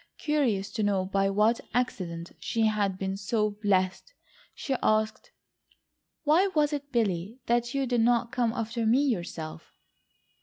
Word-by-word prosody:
Curious 255 -11 0
to 220 - -3
know 200 -3 +1
by 195 +1 +1
what 215 +4 +2
accident 180 -9 -2
she 225 -1 0
had 205 -3 +1
been 190 0 -2
so 210 +1 0
blessed, 205 - -1 0.4
she 275 - -3
asked: 215 0 +1 0.9
"Why 320 +6 +4
was 300 -1 +3
it, 285 -1 -4
Billy, 210 -2 -1
that 240 +2 0
you 275 -1 +1
did 245 -2 +1
not 235 0 +2
come 245 -4 +1
after 230 0 -2
me 245 +5 +4
yourself?" 170 - -4
220 Hz, 145 wpm, -28 LUFS, 195-245 Hz, 0.9 s, Why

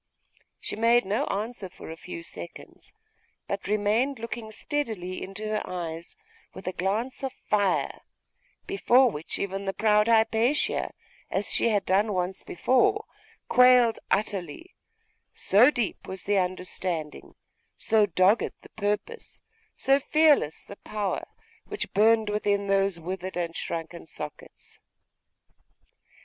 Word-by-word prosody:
She - - -5
made 230 +1 +4
no 205 +3 0
answer 210 -1 -3
for 170 - -10
a - - -6
few 170 0 -8
seconds, 85 - -9 0.6
but 200 0 -4
remained 215 +6 +1
looking 230 -1 -6
steadily 220 - -3
into 195 +3 -6
her 215 0 0
eyes 170 - -6 0.4
with 190 - -9
a 185 - -1
glance 220 +10 -2
of 265 - -1
fire, 205 -3 0 0.6
before 260 - +4
which 150 -1 -6
even 195 0 -3
the 195 - -1
proud 210 0 +3
Hypatia, 230 +4 +2 0.4
as 200 +1 -1
she - - +3
had 205 -3 +1
done 205 +3 +2
once 185 +1 -2
before, 260 - +2 0.4
quailed 250 -2 +6
utterly, 200 - -2 0.6
so 220 +7 +5
deep 240 -7 -3
was 190 -1 -6
the 205 -1 +2
understanding, 180 -3 -3 0.4
so 215 -2 +3
dogged 190 +4 +3
the - - -14
purpose, 210 - -4 0.3
so 275 +1 +3
fearless 295 - +3
the 200 - -11
power, 210 -3 -3 0.4
which 415 0 -5
burned 220 +2 +4
within 205 -1 0
those 195 -2 +1
withered 185 +2 -5
and 170 -1 -2
shrunken 165 0 -5
sockets. 150 -1 -9
205 Hz, 125 wpm, -27 LUFS, 185-230 Hz, 0.6 s, quailed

